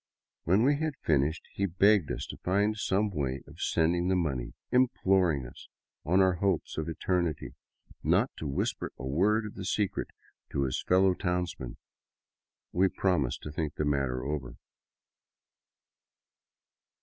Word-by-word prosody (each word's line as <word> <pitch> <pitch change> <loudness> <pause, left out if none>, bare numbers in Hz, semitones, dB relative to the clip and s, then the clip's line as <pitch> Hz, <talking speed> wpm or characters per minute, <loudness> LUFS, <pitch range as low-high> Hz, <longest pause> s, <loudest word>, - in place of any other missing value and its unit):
When 95 +7 +4
we 140 +2 +4
had 155 -1 -2
finished, 75 +2 +1
he 100 - 0
begged 95 -1 +3
us - - -3
to - - -10
find 100 +4 +1
some 105 0 0
way 70 -5 -2
of - - -13
sending 85 +2 +2
the 95 - +2
money, 70 -9 -2 0.2
imploring 95 - +3
us, 65 - -12 0.4
on 90 +5 +3
our 95 -2 +3
hopes 95 -5 0
of 80 +1 -3
eternity, 85 -1 -1 0.5
not - - +2
to 80 - -4
whisper 70 - -2
a 65 - -6
word 100 +11 +2
of 105 - -7
the 95 - -7
secret 100 +1 -1 0.5
to 70 - +1
his 65 - -1
fellow 95 +1 +4
townsmen. 90 -2 -3 0.9
We 95 +2 +3
promised 90 -10 0
to 75 - -6
think 75 -1 -3
the 75 - -1
matter 70 -3 0
over. 70 -3 -4
90 Hz, 145 wpm, -29 LUFS, 75-95 Hz, 0.9 s, When